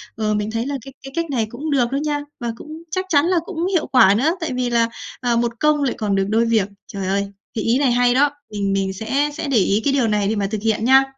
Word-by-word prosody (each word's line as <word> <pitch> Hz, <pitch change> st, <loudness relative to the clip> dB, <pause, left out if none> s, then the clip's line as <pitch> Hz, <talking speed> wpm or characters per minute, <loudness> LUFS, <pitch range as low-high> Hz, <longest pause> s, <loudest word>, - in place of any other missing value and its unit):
Ờ, 215 Hz, -1 st, 0 dB
mình 210 Hz, +1 st, -1 dB
thấy 230 Hz, +1 st, -2 dB
là 285 Hz, +1 st, -2 dB
cái 270 Hz, -, -10 dB
cái 270 Hz, -, -8 dB
cách 335 Hz, 0 st, 0 dB
này 235 Hz, -5 st, +1 dB
cũng 290 Hz, +7 st, -5 dB
được 250 Hz, -4 st, +2 dB
đó 275 Hz, -, 0 dB
nha, 295 Hz, -1 st, 0 dB, 0.2 s
và 235 Hz, -1 st, -2 dB
cũng 310 Hz, +4 st, -10 dB
chắc 370 Hz, +2 st, -1 dB
chắn 290 Hz, -2 st, +4 dB
là 360 Hz, 0 st, +2 dB
cũng 345 Hz, -3 st, -3 dB
hiệu 365 Hz, -4 st, 0 dB
quả 225 Hz, -7 st, +6 dB
nữa, 285 Hz, +8 st, +2 dB
tại 320 Hz, -5 st, -2 dB
vì 250 Hz, -1 st, -1 dB
là, 230 Hz, -1 st, +2 dB, 0.3 s
à, 245 Hz, -2 st, +1 dB
một 235 Hz, -1 st, -1 dB
công 300 Hz, -1 st, +3 dB
lại 265 Hz, -, +1 dB
còn 205 Hz, -3 st, 0 dB
được 195 Hz, 0 st, +1 dB
đôi 225 Hz, +2 st, +2 dB
việc. 225 Hz, -4 st, +2 dB, 0.2 s
Trời 195 Hz, -2 st, -5 dB
ơi! 200 Hz, +1 st, 0 dB, 0.3 s
Thì 220 Hz, -, -1 dB
ý 235 Hz, +5 st, +2 dB
này 275 Hz, -3 st, +3 dB
hay 245 Hz, 0 st, +3 dB
đó, 285 Hz, +3 st, +4 dB, 0.2 s
mình 200 Hz, -1 st, -1 dB
mình 195 Hz, -1 st, 0 dB
sẽ 265 Hz, +9 st, 0 dB
sẽ 295 Hz, 0 st, -4 dB
để 270 Hz, -, +2 dB
ý 200 Hz, +1 st, +2 dB
cái 280 Hz, -, +2 dB
điều 265 Hz, -4 st, +2 dB
này 210 Hz, -2 st, +1 dB
để 220 Hz, -, 0 dB
mà 200 Hz, -1 st, 0 dB
thực 215 Hz, -2 st, -2 dB
hiện 220 Hz, 0 st, 0 dB
nha! 265 Hz, +1 st, +7 dB
240 Hz, 285 wpm, -20 LUFS, 215-285 Hz, 0.3 s, nha